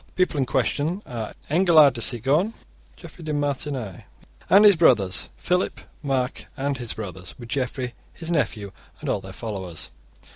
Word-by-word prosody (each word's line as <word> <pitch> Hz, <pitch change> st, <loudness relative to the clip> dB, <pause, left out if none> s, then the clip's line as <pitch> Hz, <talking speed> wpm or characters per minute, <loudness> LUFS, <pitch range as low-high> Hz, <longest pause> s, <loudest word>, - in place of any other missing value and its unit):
The -, -, -29 dB
people 185 Hz, -5 st, +1 dB
in 130 Hz, -, +1 dB
question 150 Hz, -, 0 dB
are 115 Hz, -3 st, -6 dB
Engelard 160 Hz, -4 st, +6 dB
de 120 Hz, -, -6 dB
Cigogn, 135 Hz, -, +2 dB, 0.4 s
Geoffrey 175 Hz, -, -12 dB
de 155 Hz, -1 st, -3 dB
Martigny 140 Hz, -7 st, -3 dB, 0.4 s
and 200 Hz, +3 st, +7 dB
his 205 Hz, -2 st, +8 dB
brothers, 110 Hz, -, +3 dB
Philip 180 Hz, +1 st, -1 dB, 0.2 s
Marc 130 Hz, -4 st, -2 dB
and 140 Hz, +1 st, -1 dB
his 120 Hz, -2 st, -4 dB
brothers, 95 Hz, -3 st, -7 dB
with 120 Hz, -2 st, -10 dB
Geoffrey 125 Hz, -1 st, -2 dB, 0.2 s
his 165 Hz, 0 st, -7 dB
nephew, 110 Hz, -, -1 dB, 0.3 s
and -, -, -5 dB
all -, -, 0 dB
their 95 Hz, -, -9 dB
followers. 95 Hz, -5 st, -6 dB
135 Hz, 155 wpm, -24 LUFS, 110-155 Hz, 0.4 s, his